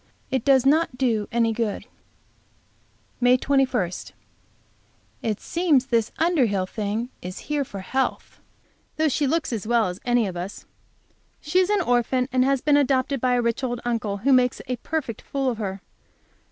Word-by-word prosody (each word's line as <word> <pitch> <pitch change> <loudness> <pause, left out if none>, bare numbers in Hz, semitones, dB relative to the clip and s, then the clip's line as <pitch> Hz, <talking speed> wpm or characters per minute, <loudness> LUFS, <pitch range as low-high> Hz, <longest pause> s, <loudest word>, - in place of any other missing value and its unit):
It 260 -3 0
does 270 -2 +4
not 295 -2 +2
do 230 -5 0
any 230 -1 +2
good. 220 -2 -2 1.3
May 250 0 +5
21. 255 -9 +1 1.3
It 215 -3 -2
seems 325 -7 +1
this 235 -4 0
Underhill 255 - +2
thing 215 +4 -3
is 180 +1 -7
here 295 -1 +1
for 200 -7 -8
health, 265 +7 -2 0.6
though 315 0 +2
she 285 +1 0
looks 315 -2 0
as 215 -2 -4
well 235 -1 +3
as 180 +2 -7
any 240 -2 +2
of 185 -3 -4
us. 180 +3 -6 0.7
She 315 +5 +1
is 370 0 +2
an 415 -2 +2
orphan, 250 -2 +1
and 255 0 +3
has 270 -1 +1
been 290 -1 +4
adopted 270 -1 +1
by 250 -1 +2
a 245 - +1
rich 235 +2 -1
old 245 -2 -2
uncle, 225 -4 -1
who 265 +7 +2
makes 250 -1 +3
a 250 0 -3
perfect 265 -4 -4
fool 270 -2 -1
of 230 - -6
her. 195 -2 -4
250 Hz, 165 wpm, -24 LUFS, 225-275 Hz, 1.3 s, May